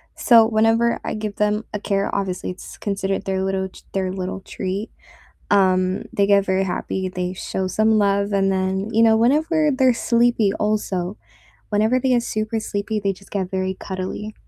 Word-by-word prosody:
so 230 -2 +6
whenever 225 +1 +2
I - - -3
give 215 -1 -5
them 210 +1 0
a 210 - -2
carrot- 200 -1 -1
obviously 190 -2 -2
it's 180 - -11
considered 195 -1 -2
their 190 -1 -1
little 190 0 -1
t - - -16
their 190 -1 -1
little 190 0 -4
treat- 195 +4 -4 0.7
um, 185 0 +2
they 200 0 +2
get 200 -1 +4
very 190 0 +1
happy, 185 +1 -3
they 180 0 -3
show 190 0 -3
some 215 +2 +2
love, 200 0 +1
and 195 -1 +2
then, 190 +2 -1
you 225 - +4
know, 220 -1 +5
whenever 305 +5 +2
they're 260 -2 +3
sleepy 235 -4 +3
also, 205 -3 -2 0.5
whenever 220 +5 +2
they 260 - 0
get 240 -1 +3
super 215 0 -2
sleepy, 210 +1 -3
they 200 -1 0
just 195 +1 -16
get 190 -3 -2
very 190 0 -1
cuddly. 190 +3 -5
200 Hz, 180 wpm, -21 LUFS, 190-220 Hz, 0.7 s, so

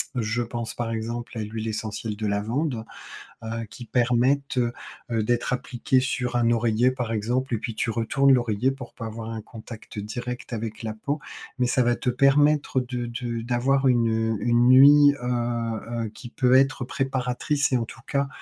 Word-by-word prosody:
Je 115 0 -1
pense 120 -1 -4
par 120 -1 -3
exemple 115 +1 -4
à 110 - -2
l'huile 110 +1 -5
essentielle 110 0 -4
de 110 +1 -4
lavande. 115 +5 -1 0.6
Heu, 115 +1 -4
qui 120 - -10
permettent, 125 +4 +1
heu 120 -1 +1 0.4
heu, 115 -2 +1
d'être 120 +2 0
appliquées 130 +1 0
sur 125 -1 -2
un 120 -1 +3
oreiller 115 +1 +2
par 125 -3 -4
exemple 125 +4 -1
et - - -1
puis 115 0 -5
tu 110 - -1
retournes 135 +5 +3
l'oreiller 120 0 +1
pour 135 -3 -9
pas 115 - -7
avoir 110 0 -6
un 115 -1 -4
contact 110 0 -10
direct 120 +5 -6
avec 110 0 -5
la 110 -1 -3
peau. 140 +7 -3 0.4
Mais 125 - +3
ça 125 - +2
va 120 0 +2
te 125 - -2
permettre 140 +1 +3
de 125 -1 -4
de 120 -1 -4
d'avoir 130 +3 +1
une, 120 -2 +3 0.2
heu, - - -2
une 120 0 +3
nuit, 145 +2 +8
heu - - -3
heu, 120 -2 -2
qui 120 - -10
peut 125 0 +3
être 135 0 +3
préparatrice 135 +2 -1
et - - +4
en 115 - -2
tout - - -12
cas, 140 0 0
120 Hz, 185 wpm, -25 LUFS, 115-130 Hz, 0.6 s, nuit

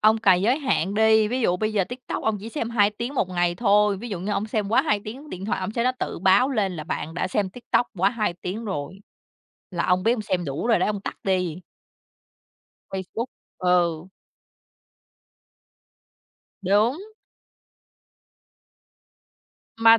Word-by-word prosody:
ông 215 +1 +5
cài 190 -5 +4
giới 245 +7 +3
hạn 200 - 0
đi, 220 0 +4
ví 255 +2 -1
dụ 180 -7 +2
bây 215 +3 -1
giờ 200 -3 +2
TikTok 245 +5 -6
ông 220 -1 +1
chỉ 220 - -7
xem 230 -3 -3
2 210 -3 +4
tiếng 235 +6 -5
1 195 - +1
ngày 175 -1 +1
thôi, 205 0 +3
ví 235 +5 -7
dụ 195 -5 -4
như 200 +3 -2
ông 200 +1 -1
xem 210 -2 -1
quá 225 - +4
2 210 - +1
tiếng 265 +8 -8
điện 185 +1 -6
thoại, 210 - -1
ông 185 +3 -3
sẽ 235 - 0
nó 255 - +3
tự - - -3
báo 190 +9 +4
lên 200 -8 0
là 155 - -5
bạn 160 0 -4
đã 180 - -1
xem 190 0 0
TikTok 240 +2 0
quá 195 +3 +4
2 215 -5 -1
tiếng 210 +6 -4
rồi, 190 -2 -4 0.7
là 170 -2 -1
ông 180 0 +2
biết 225 - +3
ông 230 -3 -2
xem 185 -4 -1
đủ 140 +8 -3
rồi 235 - +4
đó - - +1
ông 210 -1 -1
tắt - - -5
đi. 180 -3 0 1.3
Facebook, 195 +6 -4 0.3
ừ. 175 -2 +1 2.5
Đúng. 215 - +2 2.7
Mà 225 0 +7
205 Hz, 175 wpm, -24 LUFS, 185-225 Hz, 2.7 s, Mà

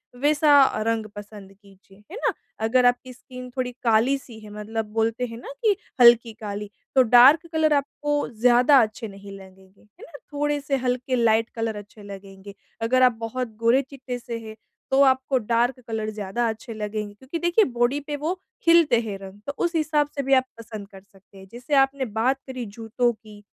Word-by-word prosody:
वैसा 290 +1 +5 0.2
रंग 225 -1 0
पसंद 205 -1 -11
कीजिए। 195 -1 -22
है 400 - -7
ना - - +2 0.3
अगर 250 +2 +3
आप 245 0 +5
की 255 -1 -11
स्किन 250 0 -11
थोड़ी 250 -1 -1
काली 235 +4 +3
सी 240 -4 -13
है, 215 -1 -12
मतलब 215 +2 -5
बोलते 225 +2 0
हैं 230 -1 -9
ना 240 - -9
कि 425 -3 +4 0.3
हल्की 235 -1 +6
काली 205 -1 -5 0.3
तो 265 - +7
डार्क 255 +7 +6
कलर 315 -1 +2
आपको 290 +1 -1
ज़्यादा 245 +4 +4
अच्छे 225 +1 -3
नहीं 200 0 -12
लगेंगे। 190 0 -17
है 210 - -25
ना? - - -14 0.2
थोड़े 295 0 -1
से 275 0 -1
हल्के 255 +1 -1
लाइट 225 -1 +2
कलर 225 -1 -2
अच्छे 205 +1 -11
लगेंगे। 195 0 -11 0.3
अगर 250 +3 +2
आप 250 - +6
बहुत 240 +2 -3
गोरे-चिट्टे 255 +2 0
से 235 -1 -6
हैं, 220 -1 -10 0.4
तो 270 +1 +4
आपको 260 0 +3
डार्क 240 +2 0
कलर 220 -1 -3
ज़्यादा 215 +3 -2
अच्छे 225 +1 -7
लगेंगे, 210 -1 -5
क्योंकि 260 +10 -7
देखिए 345 +6 +3
बॉडी 240 +4 +1
पे 295 - -3
वो 300 +4 -2 0.4
हिलते 335 -8 +5
हैं 210 -4 -5
रंग, 195 +1 -11
तो 280 - -3
उस 340 0 -2
हिसाब 305 -2 +1
से 280 - -2
भी 270 +1 +1
आप 260 -1 +4
पसंद 220 -3 -9
कर 195 -1 -14
सकते 195 0 -22
हैं। 190 0 -13
जैसे 245 +5 -7
आपने 270 0 -3
बात 260 +4 +1
करी 255 -2 -6
जूतों 225 +3 -1
की। 215 -1 -16
235 Hz, 190 wpm, -24 LUFS, 215-270 Hz, 0.4 s, तो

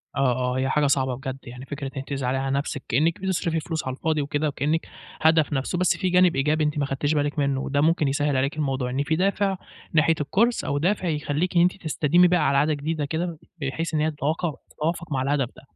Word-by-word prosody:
آه، 135 -2 +3
آه، 125 0 -1
هي 130 0 0
حاجة 150 +1 +2
صعبة 130 -2 +1
بجد 130 +1 -5
يعني، 125 +1 -9
فكرة 140 -1 -5
إن 135 - -3
أنتِ 135 - -13
تزعلي 135 -2 -1
على 135 0 -1
نفسِك 140 -1 -3
كأنِك 155 +8 +1
بتصرفي 170 -4 0
فلوس 160 -3 -4
على 130 - -2
الفاضي 155 0 0
وكده 145 +2 -1
وكأنِك 150 +3 -1 0.3
هدف 160 -1 +4
نَفْسه، 135 +6 -1
بس 180 0 +2
فيه 185 -2 -1
جانب 180 -1 +5
إيجابي 150 +3 +1
أنتِ 150 0 0
ما 145 - +1
خدتيش 140 +2 -1
بالِك 145 0 0
منه 140 -2 +1
وده 145 +1 0
ممكن 160 -2 +3
يسهِّل 145 0 +1
عليكِ 140 +3 0
الموضوع؛ 135 -4 -1
إن 135 +3 -1
في 160 +2 0
دافع 195 +1 +1 0.4
ناحية 160 +1 +4
الكورس 225 +11 +1
أو 140 - -1
دافع 185 +4 0
يخلّيكِ 150 +3 -1
إن 170 - +6
أنتِ 180 +2 +1
تستديمي 165 +3 +3
بقى 175 -3 +2
على 140 0 +2
عادة 150 +2 +3
جديدة 150 +1 -2
كده، 165 +2 -3 0.2
بحيث 160 +4 -3
إن 155 - +1
هي 155 - +1
تتواقع 155 +3 -1 0.2
تتوافق 165 +1 -3
مع 135 -2 0
الهدف 135 -2 0
ده - - -14
150 Hz, 230 wpm, -24 LUFS, 135-165 Hz, 0.4 s, إن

